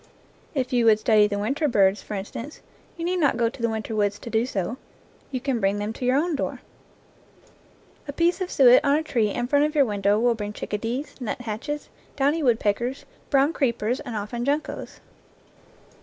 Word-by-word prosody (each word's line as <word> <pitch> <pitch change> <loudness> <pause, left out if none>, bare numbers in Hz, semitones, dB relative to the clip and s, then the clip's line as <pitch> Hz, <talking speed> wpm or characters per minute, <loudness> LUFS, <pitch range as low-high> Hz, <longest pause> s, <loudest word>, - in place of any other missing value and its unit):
If 260 -1 -1
you 240 -2 +3
would 220 -2 +6
study 215 -1 +4
the 205 -1 -3
winter 270 +9 0
birds, 200 -5 +3
for 210 - -6
instance, 230 +8 -7 0.4
you 335 - -4
need 365 +1 0
not 290 -7 +2
go 230 -1 +2
to 240 - -12
the 230 - +1
winter 220 0 -4
woods 205 -1 +1
to 230 - -9
do 225 +2 +1
so; 210 +1 -3 0.5
you 260 - -3
can 255 -2 -1
bring 195 0 +1
them 205 +2 -3
to 250 - -5
your 255 +2 +3
own 330 +2 +1
door. - - -3 1.5
A - - -3
piece 340 +5 +1
of 365 - -2
suet 250 -2 +6
on 285 -1 +3
a 315 - -1
tree 230 -8 +1
in 240 +4 -2
front 285 +3 +3
of 305 +1 -3
your 285 -2 +5
window 205 -1 +1
will 240 +1 +3
bring 210 -2 -5
chicka 210 0 -4
dees, 245 +6 -3
nuthatches, 245 +5 -4 0.3
downy 290 +4 +1
woodpeckers, 240 0 0 0.2
brown 280 +2 +3
creep 245 -7 0
ers, 240 +5 0
and 235 - -6
often 215 +3 -4
juncos. 290 +4 -3
240 Hz, 200 wpm, -24 LUFS, 215-280 Hz, 1.5 s, would